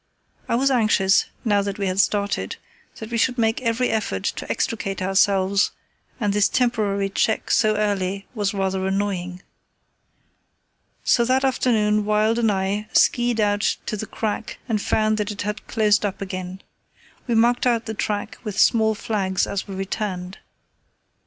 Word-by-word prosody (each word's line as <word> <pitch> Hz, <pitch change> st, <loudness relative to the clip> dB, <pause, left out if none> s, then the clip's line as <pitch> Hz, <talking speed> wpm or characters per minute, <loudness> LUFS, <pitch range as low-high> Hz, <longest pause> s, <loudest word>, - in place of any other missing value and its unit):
I -, -, +2 dB
was 270 Hz, +3 st, +2 dB
anxious, 215 Hz, -5 st, +3 dB, 0.2 s
now 205 Hz, -2 st, +3 dB
that 200 Hz, +1 st, -4 dB
we 200 Hz, -, -2 dB
had 185 Hz, 0 st, -1 dB
started, 200 Hz, 0 st, 0 dB, 0.4 s
that 220 Hz, +1 st, -9 dB
we 230 Hz, -, 0 dB
should 250 Hz, +2 st, +1 dB
make 225 Hz, +1 st, +1 dB
every 235 Hz, +1 st, 0 dB
effort 220 Hz, -1 st, -2 dB
to -, -, -3 dB
extricate 195 Hz, -3 st, -2 dB
ourselves, 195 Hz, +1 st, +2 dB, 0.5 s
and 205 Hz, -4 st, 0 dB
this 205 Hz, -1 st, +3 dB
temporary 210 Hz, -5 st, +1 dB
check 215 Hz, +3 st, 0 dB
so 215 Hz, -2 st, +3 dB
early 200 Hz, -2 st, -1 dB
was 205 Hz, -4 st, -1 dB
rather 190 Hz, -1 st, -1 dB
annoying. 190 Hz, -2 st, -2 dB, 1.6 s
So 235 Hz, -, +3 dB
that 260 Hz, +2 st, +2 dB
afternoon 215 Hz, -5 st, +2 dB
Wild 215 Hz, +2 st, +2 dB
and 225 Hz, -2 st, +3 dB
I 200 Hz, +2 st, -1 dB
ski 240 Hz, -1 st, +3 dB
ed 235 Hz, -2 st, -1 dB
out 205 Hz, -1 st, +1 dB
to 215 Hz, -, -2 dB
the 215 Hz, +1 st, -5 dB
crack 220 Hz, 0 st, -4 dB
and 220 Hz, -4 st, 0 dB
found 215 Hz, +1 st, +1 dB
that 210 Hz, 0 st, -1 dB
it 205 Hz, -1 st, -4 dB
had 210 Hz, 0 st, -5 dB
closed 215 Hz, -2 st, +2 dB
up 200 Hz, -2 st, -2 dB
again. 185 Hz, -1 st, -6 dB, 0.6 s
We 235 Hz, -, +1 dB
marked 240 Hz, +2 st, +3 dB
out 235 Hz, -2 st, +1 dB
the 220 Hz, -, -4 dB
track 205 Hz, -1 st, -3 dB
with 210 Hz, -4 st, -4 dB
small 220 Hz, -1 st, +4 dB
flags 195 Hz, -4 st, -1 dB
as 200 Hz, -, -4 dB
we 195 Hz, -, -6 dB
returned. 190 Hz, -2 st, -4 dB
210 Hz, 160 wpm, -22 LUFS, 195-225 Hz, 1.6 s, small